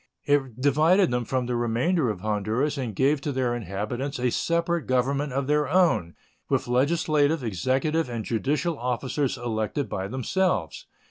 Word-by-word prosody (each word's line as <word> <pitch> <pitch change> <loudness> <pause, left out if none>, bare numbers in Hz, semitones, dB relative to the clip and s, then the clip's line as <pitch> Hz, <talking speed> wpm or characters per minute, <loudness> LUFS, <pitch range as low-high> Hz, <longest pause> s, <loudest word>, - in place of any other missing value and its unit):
It 135 -5 +1
divided 155 +6 +4
them 120 -1 -1
from 130 +2 -1
the 125 0 -2
remainder 120 +6 +1
of 100 -4 -4
Honduras 110 +8 0
and 125 -7 -4
gave 140 +4 +2
to 145 - -2
their 130 -2 0
inhabitants 120 - -4
a 125 -1 0
separate 170 +2 0
government 135 +3 0
of 135 +1 -1
their 150 0 +1
own, 145 - +2 0.3
with - - 0
legislative, 145 +3 +2
executive, 130 - 0
and 115 -3 -4
judicial 145 +7 -1
officers 130 +3 -1
elected 115 +2 -2
by 95 0 -3
themselves. 175 - -1
130 Hz, 150 wpm, -25 LUFS, 120-150 Hz, 0.3 s, divided